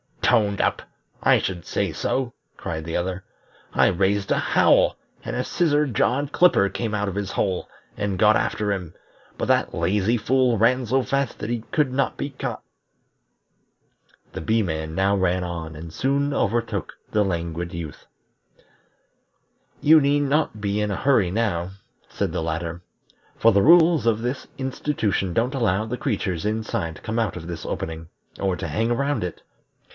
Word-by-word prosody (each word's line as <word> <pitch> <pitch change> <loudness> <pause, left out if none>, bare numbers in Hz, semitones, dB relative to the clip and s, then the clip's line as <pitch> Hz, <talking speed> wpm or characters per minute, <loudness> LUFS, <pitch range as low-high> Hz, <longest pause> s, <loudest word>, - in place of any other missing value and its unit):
"Toned 105 -4 +3
up! - - +1 0.4
I - - +5
should 90 -3 -4
say 100 -4 -1
so!" 120 - -2 0.2
cried 80 -1 -5
the 85 - -4
other. 90 +2 -2 0.5
"I - - +4
raised 100 +2 +1
a - - +3
howl, - - +4 0.3
and - - -3
a - - 0
Scissor 150 -3 +2
jawed 135 +2 0
Clipper 145 - +4
came 110 +2 -3
out 105 -1 -1
of 95 - -6
his 100 -2 -3
hole, 95 -2 -1 0.3
and 100 -2 -1
got 105 +2 +5
after 105 -2 -1
him; 90 -5 -4 0.4
but - - -2
that - - +2
lazy 95 +6 +1
fool 125 +1 +2
ran 125 +4 +3
so 130 +3 +1
fast 140 -1 -1
that 105 - -4
he 120 -2 -3
could 150 -4 +2
not 135 +1 0
be 140 - -3
caught." 135 - -5 1.7
The - - -6
Bee 110 +7 +1
man 80 -3 -3
now 100 +2 +2
ran 90 -1 +1
on 80 -2 -5
and 80 +1 -9
soon 140 - 0
overtook 115 -2 -1 0.2
the 105 -1 +2
Languid 85 -1 -3
Youth. 80 -4 -7 1.8
"You 155 +2 +7
need 145 0 +2
not 140 -6 0
be 100 0 -1
in 105 0 0
a - - -1
hurry 115 -4 +3
now," 95 -4 -1 0.4
said - - -2
the - - -2
latter, 80 +1 -3 0.6
"for 115 - +5
the 100 -1 +4
rules 165 - +6
of 115 -1 +2
this 125 +3 -3
institution 130 - -1
don't 120 +7 +1
allow 110 -5 +1
the 120 +3 -4
creatures 100 - -2
inside 110 -6 -2
to - - -13
come 110 +1 -2
out 110 -7 0
of 85 -2 -7
this 85 -3 -6
opening, 80 0 -4 0.3
or 95 -2 0
to 85 - -5
hang 110 +9 0
around 140 -3 0
it. 90 - -7
105 Hz, 170 wpm, -23 LUFS, 90-125 Hz, 1.8 s, You